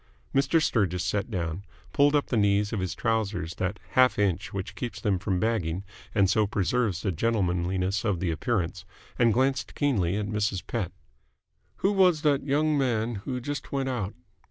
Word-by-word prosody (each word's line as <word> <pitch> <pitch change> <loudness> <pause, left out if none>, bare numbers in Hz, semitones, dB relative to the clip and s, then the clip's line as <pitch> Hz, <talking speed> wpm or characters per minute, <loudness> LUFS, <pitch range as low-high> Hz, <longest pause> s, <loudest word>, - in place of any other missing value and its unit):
Mr. 140 +4 +3
Sturgis 95 - +1
sat 100 +4 -1
down, 90 -2 -3 0.3
pulled 145 +1 +4
up 145 - +2
the - - -2
knees 100 0 +2
of 110 - -1
his 90 -2 -2
trousers 110 -7 -1
that 95 +3 -2
half 130 -4 +4
inch 95 -1 0
which 95 -2 -5
keeps 120 +3 -5
them 100 -5 0
from 95 -1 -1
bagging 95 -5 -1 0.3
and 100 -2 +4
so 105 +2 +2
preserves 105 -1 0
the 100 - +1
gentlemanliness 95 -1 0
of 100 -6 0
the 90 -2 0
appearance, 90 +1 -1 0.4
and 120 -1 +5
glanced 130 +2 0
keenly 100 - +1
at 105 - -1
Mrs. 105 -2 -1
Pett. 105 -7 -2 0.9
"Who 195 - +5
was 185 -6 +4
that 145 -2 +3
young 150 +2 +2
man 120 -3 0
who 130 -2 -2
just 145 +4 -5
went 135 -1 -1
out?" 105 -6 -3
105 Hz, 175 wpm, -27 LUFS, 95-125 Hz, 0.9 s, and